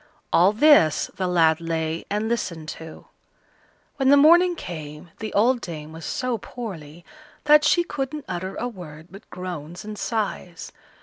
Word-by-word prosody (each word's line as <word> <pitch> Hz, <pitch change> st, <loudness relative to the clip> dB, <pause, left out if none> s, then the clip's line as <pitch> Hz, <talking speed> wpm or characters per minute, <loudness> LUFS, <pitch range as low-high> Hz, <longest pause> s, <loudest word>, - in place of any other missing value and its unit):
All 180 Hz, +4 st, +5 dB
this 215 Hz, -, +4 dB
the 185 Hz, -, -2 dB
lad 165 Hz, -2 st, +3 dB
lay 165 Hz, -1 st, -3 dB
and 210 Hz, +2 st, -1 dB
listened 175 Hz, -9 st, -3 dB
to. 160 Hz, 0 st, -10 dB, 0.9 s
When 270 Hz, -1 st, +2 dB
the 285 Hz, -, +7 dB
morning 345 Hz, +5 st, +6 dB
came 155 Hz, -, -8 dB
the 220 Hz, -1 st, -5 dB
old 240 Hz, +4 st, +3 dB
dame 155 Hz, -3 st, -7 dB
was 160 Hz, 0 st, -9 dB
so 250 Hz, -3 st, -2 dB
poorly 175 Hz, -10 st, -9 dB, 0.4 s
that 300 Hz, 0 st, +6 dB
she 345 Hz, +3 st, +3 dB
couldn't 295 Hz, -2 st, -5 dB
utter 185 Hz, +1 st, -5 dB
a 245 Hz, -, -3 dB
word 170 Hz, -7 st, -11 dB
but 195 Hz, +3 st, -14 dB
groans 175 Hz, 0 st, -7 dB
and 215 Hz, -1 st, -7 dB
sighs. 200 Hz, -6 st, -4 dB
185 Hz, 150 wpm, -23 LUFS, 165-245 Hz, 0.9 s, the